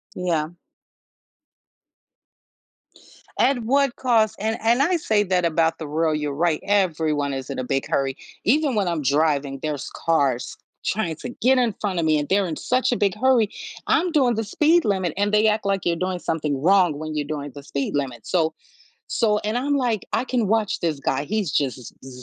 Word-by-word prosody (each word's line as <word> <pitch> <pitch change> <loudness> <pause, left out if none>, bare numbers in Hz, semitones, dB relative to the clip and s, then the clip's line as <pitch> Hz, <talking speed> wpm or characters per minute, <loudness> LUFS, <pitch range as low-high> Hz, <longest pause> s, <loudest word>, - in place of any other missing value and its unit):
Yeah. 165 -4 -1 2.9
At 265 -1 +3
what 270 +2 +1
cost? 220 -4 +2
And 220 +2 -1
and 235 +4 +3
I 350 +5 +3
say 215 -9 +1
that 180 -3 +1
about 165 0 +1
the 155 - -6
world, 155 +1 0
you're 150 -1 -3
right. 160 +1 +1
Everyone 160 -8 +1
is 135 -1 -5
in - - -4
a - - -2
big 135 +2 -2
hurry. 135 -1 0 0.3
Even 280 +3 +2
when 200 -3 +1
I'm 170 -3 -1
driving, 140 -1 +1
there's 150 -4 -3 0.2
cars 140 -7 +1 0.3
trying 185 -6 -1
to 245 - -7
get 260 +2 +4
in 240 -4 +1
front 195 -4 -2
of 165 - 0
me, 155 -1 +3
and 145 -1 -2
they're 195 0 +2
in 160 - -3
such 255 +9 0
a 245 - +1
big 200 -2 +1
hurry. 240 -2 +3 0.4
I'm 360 0 +2
doing 260 -7 +3
the 225 - -1
speed 315 +10 +3
limit, 190 -5 0
and 205 +1 0
they 210 +1 +4
act 215 -1 +1
like 195 -2 0
you're 170 - +2
doing 185 +1 -2
something 150 -5 -2
wrong 180 -2 +4
when 155 0 -5
you're 145 -1 -2
doing 145 -2 -5
the 145 - -10
speed 140 0 -3
limit. 135 -4 -3
So 160 -3 +1 0.6
so 210 -3 +1
and 215 +3 0
I'm, 285 +3 0
like, 240 -6 -1
"I - - +1
can 250 -4 0
watch 215 0 0
this 160 -4 -1
guy." 135 +1 -1
he's, 205 0 -1
just, 135 -3 0 0.3
z 125 -1 -10
180 Hz, 195 wpm, -23 LUFS, 150-220 Hz, 2.9 s, get